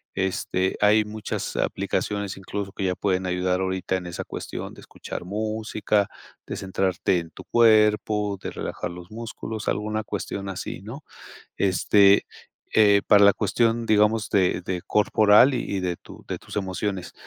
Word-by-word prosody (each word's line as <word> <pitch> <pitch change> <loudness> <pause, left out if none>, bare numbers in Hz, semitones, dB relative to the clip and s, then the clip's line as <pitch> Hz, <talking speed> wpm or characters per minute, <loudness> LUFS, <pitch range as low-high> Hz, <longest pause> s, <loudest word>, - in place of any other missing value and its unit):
este, 95 -1 -1
hay 105 +1 +5
muchas 105 0 -5
aplicaciones 100 0 -2
incluso 100 +1 -5
que 100 -2 -4
ya 90 -1 0
pueden 95 -2 0
ayudar 90 0 0
ahorita 95 0 -1
en 90 - -7
esa 85 - -5
cuestión - - -7
de - - -14
escuchar - - -8
música, 105 0 -1 0.4
de - - -4
centrarte 95 -1 0
en 80 -1 -9
tu - - -12
cuerpo, 105 -3 +3
de - - -5
relajar - - -5
los 90 +2 -11
músculos, 110 -1 -6
alguna 110 +1 -1
cuestión 100 -1 -5
así, 95 -2 -5
¿no? 125 +8 -9 0.5
Este, 100 +1 +4 0.5
eh, 100 -2 +6
para 100 -1 +6
la 100 - +7
cuestión, 115 0 +1
digamos, 105 0 +2
de 95 -3 +2
de 90 -1 -3
corporal 105 +4 +5
y 100 -5 -2
de 90 -2 -2
tu - - -14
de - - -4
tus - - -11
emociones. 95 -1 -3
100 Hz, 155 wpm, -24 LUFS, 95-105 Hz, 0.5 s, la